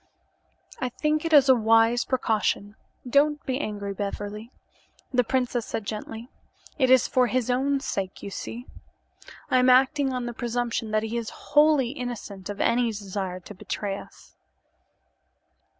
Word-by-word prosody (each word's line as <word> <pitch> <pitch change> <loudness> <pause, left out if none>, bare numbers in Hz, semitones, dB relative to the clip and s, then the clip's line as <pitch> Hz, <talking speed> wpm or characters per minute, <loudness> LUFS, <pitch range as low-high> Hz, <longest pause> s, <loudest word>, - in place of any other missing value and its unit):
"I 255 - -1
think 305 +5 -1
it 330 - -1
is 285 -3 +7
a 260 - +8
wise 225 0 +3
precaution. 215 -4 0 0.3
Don't 295 +3 +2
be 260 0 -1
angry, 205 -7 -4
Beverly," 205 +3 -5 0.6
the 250 0 +4
princess 245 -1 -1
said 220 - -4
gently. 220 +2 -6 0.5
"It 260 -2 +3
is 260 -2 +6
for 250 -1 +3
his 250 0 0
own 275 +3 +1
sake, 195 -7 -4
you 200 - -6
see. 240 +5 -6 0.9
I 255 - +5
am 250 0 +4
acting 265 +2 +4
on 250 -1 -3
the 240 - -4
presumption 235 -1 -2
that 215 0 +1
he 225 +2 -3
is 230 -2 -3 0.2
wholly 295 -4 +5
innocent 235 -8 -6
of 205 - -5
any 240 0 +2
desire 195 -4 -4
to 210 - -11
betray 200 +1 -4
us." - - -13
240 Hz, 150 wpm, -26 LUFS, 215-260 Hz, 0.9 s, a